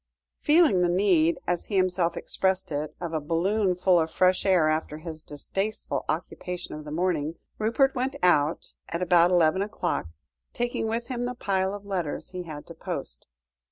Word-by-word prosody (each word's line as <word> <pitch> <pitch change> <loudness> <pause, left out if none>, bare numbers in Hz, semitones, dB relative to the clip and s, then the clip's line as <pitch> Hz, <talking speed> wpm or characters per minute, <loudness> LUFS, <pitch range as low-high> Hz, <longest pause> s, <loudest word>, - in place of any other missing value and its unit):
Feeling 300 - +4
the 175 - +3
need, 175 -3 +3
as 175 -1 -1
he 205 - -3
himself 185 -2 +1
expressed 190 -3 0
it, 150 +1 -3
of 170 -2 -4
a 160 - +1
balloon 180 +5 +1
full 180 0 +4
of 160 0 0
fresh 185 +3 +2
air 180 -5 +4
after 155 -1 -1
his 160 0 -8
distasteful 195 +9 -3
occupation 180 -1 -4
of 150 0 -7
the 150 - -7
morning, 165 -2 0 0.2
Rupert 235 +5 +2
went 260 +1 -1
out 155 -3 +2 0.2
at 170 +2 -2
about 175 -1 +5
eleven 175 0 +3
o'clock, 205 - -2 0.5
taking 240 -2 -1
with 230 +2 -2
him 245 -1 -3
the 250 0 -3
pile 190 -4 0
of 205 0 -10
letters 180 -7 -3
he 185 -1 -5
had 155 -4 -8
to - - -9
post. - - -4
180 Hz, 175 wpm, -26 LUFS, 165-200 Hz, 0.5 s, about